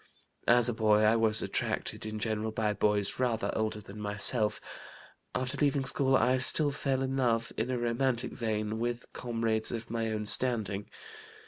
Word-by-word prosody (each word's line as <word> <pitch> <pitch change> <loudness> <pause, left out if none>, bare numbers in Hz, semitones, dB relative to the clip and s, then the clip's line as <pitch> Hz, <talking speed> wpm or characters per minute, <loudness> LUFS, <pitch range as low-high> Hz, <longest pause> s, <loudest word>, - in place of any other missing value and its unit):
"As 120 0 +5
a 120 - 0
boy 110 -1 +2
I 110 +1 +4
was 110 -1 +4
attracted - - -3
in 110 0 -5
general 110 0 -2
by 110 -1 -1
boys 105 0 +1
rather 120 -3 -1
older 110 0 -2
than 105 0 -11
myself; 105 +2 +3 0.8
after 130 +2 +2
leaving 140 -2 +1
school 135 0 +1
I 130 0 +2
still 145 +3 +2
fell 135 -1 -2
in 135 0 -3
love, 115 -3 0
in 115 +3 -2
a 130 - -1
romantic 120 +1 -1
vein, 110 -1 -3
with 120 +1 -3
comrades 115 -2 -1
of 115 0 -6
my 115 -1 -2
own 105 -1 -3
standing. 105 -4 +1
115 Hz, 165 wpm, -29 LUFS, 110-125 Hz, 0.8 s, As